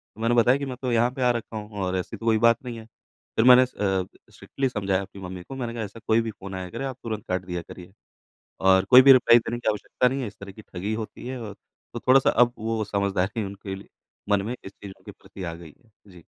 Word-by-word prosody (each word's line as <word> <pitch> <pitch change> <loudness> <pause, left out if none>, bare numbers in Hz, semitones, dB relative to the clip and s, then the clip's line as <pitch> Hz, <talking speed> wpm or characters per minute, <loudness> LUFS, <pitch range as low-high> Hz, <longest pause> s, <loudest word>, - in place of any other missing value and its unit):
तो 110 - -11
मैंने 115 +1 +2
बताया 120 +3 +4
कि 140 - -4
मैं 130 -2 -6
तो 130 -2 -1
यहाँ 120 +1 +2
पे 130 - -7
आ 125 - +4
रखा 115 -2 -5
हूँ 105 -1 -8
और 90 0 -1
ऐसी 90 - -5
तो 115 - -9
कोई 110 -1 +3
बात 115 +1 +3
नहीं 120 -2 -6
है। 110 - -12 0.5
फिर 110 - +3
मैंने 125 0 +9
अ, - - +1
स 95 -6 -2 0.3
स्ट्रिक्टली 135 -1 -3
समझाया 100 -4 -1
अपनी 100 0 -11
मम्मी 90 -1 -7
को। 135 - -9
मैंने 120 -3 -4
कहा 115 -1 -4
ऐसा 105 +2 -9
कोई 110 +1 +4
भी 115 -1 -4
फ़ोन 100 -2 -9
आया 95 -1 -5
करे, 115 +7 -5
आप 130 -2 -5
तुरंत 110 -3 -5
काट 90 0 -2
दिया 90 -1 -4
करिए 90 +2 -13 0.7
और 95 0 +4
कोई 125 0 +10
भी 135 +1 +8
रिप्लाई 120 -2 +6
देने 120 +1 -5
की 120 - 0
आवश्यकता 105 +4 0
नहीं 135 +2 -1
है। 125 - -3
इस 105 - -11
तरह 100 0 -9
की 110 - -13
ठगी 100 +1 -5
होती 110 +2 -6
है 130 0 -5
और 105 -3 -7 0.4
तो - - -4
थोड़ा-सा 130 +1 +4
अब 120 0 +3
वो 110 0 -2
समझदारी 100 +1 -1
उनके 100 0 -7 0.5
मन 100 -1 +3
में 120 +3 -3
इस 95 - -9
चीज़ों 100 -1 -13
के - - -8
प्रति 95 - -12
आ 85 -2 -4
गई 85 -3 -13
है 115 - -28 0.2
जी। 90 -2 -15
110 Hz, 265 wpm, -25 LUFS, 95-120 Hz, 0.7 s, कोई